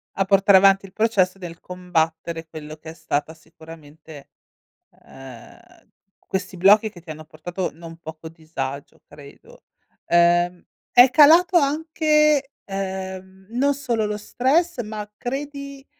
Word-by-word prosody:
A 195 - 0
portare 195 0 +5
avanti 195 0 +4
il 195 - -14
processo 195 -3 +1
del 170 -3 -10
combattere 165 -2 -3
quello 155 -1 -10
che 160 +1 -12
è - - -9
stata 160 -2 -3
sicuramente 160 -2 -15 0.7
ehm, 130 -3 -13 0.7
questi 190 -1 -4
blocchi 205 +4 +5
che 185 -5 -15
ti 165 -1 -10
hanno 155 0 -10
portato 175 +4 -5
non 165 +1 -12
poco 160 -1 -10
disagio, 150 -4 -7
credo. 145 -1 -16 0.4
Ehm, 175 +1 +2 0.3
è 245 +1 +7
calato 330 +6 +6
anche, 305 -1 +2 0.2
ehm, 190 -1 -6
non 275 +4 +1
solo 235 -6 -2
lo 210 0 -3
stress, 265 +8 0
ma 210 -1 -7
credi, 280 +1 -6
190 Hz, 130 wpm, -22 LUFS, 160-245 Hz, 0.7 s, è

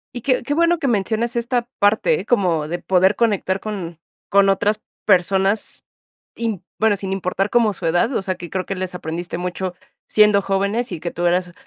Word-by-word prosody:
Y 245 - -4
qué 255 +1 +1
qué 285 +4 -1
bueno 335 +1 +3
que 280 - -1
menciones 230 +2 0
esta 235 0 -1
parte, 220 - +2
como 175 -10 +1
de 175 +3 -3
poder 190 +2 +3
conectar 200 -4 0
con 185 -6 -6 0.3
con 200 0 +4
otras 210 +2 +1 0.2
personas, 195 +2 +2 0.5
im 225 -6 -3 0.2
bueno, 220 -1 +3
sin 195 -1 -5
importar 195 +1 -1
como 230 -3 +3
su 175 - -6
edad, 175 +10 +1
o - - +1
sea, 190 -1 -2
que 175 -1 -9
creo 185 +1 -3
que - - -3
les 185 -1 -4
aprendiste 170 +1 -5
mucho, 180 0 -4 0.3
siendo 210 -1 +5
jóvenes 200 +5 -1
y 175 - -4
que 170 +2 -4
tú 175 - -3
eras, 180 0 0
195 Hz, 190 wpm, -20 LUFS, 180-225 Hz, 0.5 s, siendo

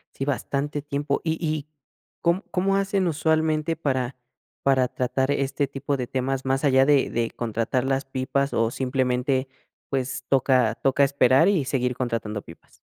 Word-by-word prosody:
Sí, - - -3
bastante 145 +1 -2
tiempo. 145 0 -2
¿Y 160 0 0
y 155 -2 -2 0.5
com 170 +3 +2
cómo 195 +2 +1
hacen 195 -1 +1
usualmente 160 0 +1
para 130 -5 -1 0.5
para 130 -2 +3
tratar 130 +2 -1
este 140 0 0
tipo 140 +1 -3
de 125 -2 -3
temas 135 +1 -2
más 135 +1 0
allá 135 -2 +5
de 145 -1 +3
de 115 -1 -1
contratar 115 +2 -1
las 135 +1 0
pipas 135 +1 -1
o 115 0 +1
simplemente, 130 0 0 0.4
pues, 135 -1 -2
toca 130 -4 +3
toca 135 +3 +2
esperar 135 +4 +4
y 180 -9 +1
seguir 125 -1 -1
contratando 115 -4 -2
pipas? 85 - -16
135 Hz, 155 wpm, -24 LUFS, 130-145 Hz, 0.5 s, allá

